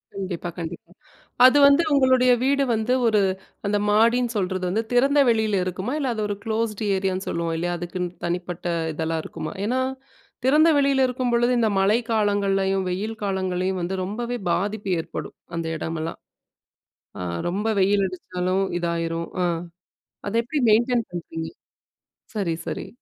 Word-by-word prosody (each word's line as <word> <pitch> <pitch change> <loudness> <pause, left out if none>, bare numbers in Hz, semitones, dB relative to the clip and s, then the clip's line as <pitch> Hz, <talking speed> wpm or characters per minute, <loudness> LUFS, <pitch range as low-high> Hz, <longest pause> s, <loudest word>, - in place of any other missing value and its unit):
கண்டிப்பா 185 -3 -4
கண்டிப்பா. 170 0 -7 0.6
அது 260 +3 +6
வந்து 280 +4 +6
உங்களுடைய 260 -2 +5
வீடு 280 +1 +3
வந்து, 220 +3 0
ஒரு 215 -2 +4 0.5
அந்த 205 +1 +1
மாடின்னு 235 +3 +3
சொல்றது 185 -2 -1
வந்து, 215 +5 0
திறந்த 275 +4 +4
வெளில 220 -4 +2
இருக்குமா, 185 +6 -3
இல்ல 280 -3 -1
அது 215 - -2
ஒரு 205 - -2
க்ளோஸ்ட் 220 -1 -1
ஏரியான்னு 190 0 -2
சொல்லுவோம், 170 -1 -2
இல்லையா 175 +2 -1
அதுக்குன்னு 175 +1 -4 0.2
தனிப்பட்ட 175 0 -4 0.3
இதெல்லா 160 +1 -1
இருக்குமா? 155 - -6
ஏன்னா, 255 +3 +1 0.6
திறந்த 300 +5 +5
வெளில 275 -1 +3
இருக்கும்பொழுது 245 -1 +1
இந்த 225 -2 +2
மழை 200 +4 +4
காலங்கள்லேயும், 195 -2 +1
வெயில் 210 +5 -3
காலங்கள்லேயும் 185 -1 -1
வந்து 185 +3 -2
ரொம்பவே 240 +5 -3
பாதிப்பு 200 +3 -1
ஏற்படும். - - -7 0.2
அந்த 165 - -2
இடமெல்லாம், 160 +1 -4 1.0
ஆ - - -4 0.3
ரொம்ப 200 +5 -2
வெயில் 200 +1 +3
அடிச்சாலும் 185 +1 -2 0.2
இதாயிரும். 170 -1 -2 0.2
அ. - - +2 0.8
அத 200 - -3
எப்படி 290 +5 -2
மெயின்டெய்ன் 235 +1 +2
பண்ணுறீங்க. 165 -2 -5 0.9
சரி 185 -6 0
சரி. - - -4
200 Hz, 140 wpm, -24 LUFS, 180-235 Hz, 1.0 s, அது